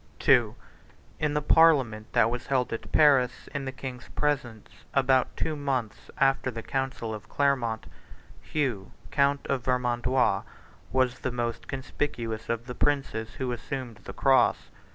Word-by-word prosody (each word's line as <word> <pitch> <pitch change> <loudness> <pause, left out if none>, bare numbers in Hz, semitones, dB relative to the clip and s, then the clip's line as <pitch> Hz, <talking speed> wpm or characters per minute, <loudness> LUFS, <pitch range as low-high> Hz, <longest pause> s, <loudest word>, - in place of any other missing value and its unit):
II. - - +5 0.6
In 150 -1 0
the 150 - 0
parliament 135 -10 +4
that 115 - +4
was 125 0 -4
held 130 -3 0
at 115 - -6
Paris, 135 -5 +4
in 140 -1 -3
the 130 - -3
king's 130 -2 -8
presence, 135 -7 -1 0.3
about 130 -1 +2
two 160 -1 -1
months 135 -6 -3
after 135 -1 +2
the 115 -2 -6
council 135 -4 -3
of 105 -1 -9
Clermont, 130 -6 0 0.6
Hugh, 125 - -2 0.2
count 140 0 +2
of 135 -2 -1
Vermandois, 125 +1 +1 0.5
was 130 0 +1
the 130 - -2
most 120 -1 -3
conspicuous 120 -4 -4
of 115 0 -2
the 125 - -6
princes 135 -6 -1
who 130 -2 -2
assumed 120 -1 -5
the 100 - -10
cross. 135 -1 +3
130 Hz, 145 wpm, -27 LUFS, 120-140 Hz, 0.6 s, II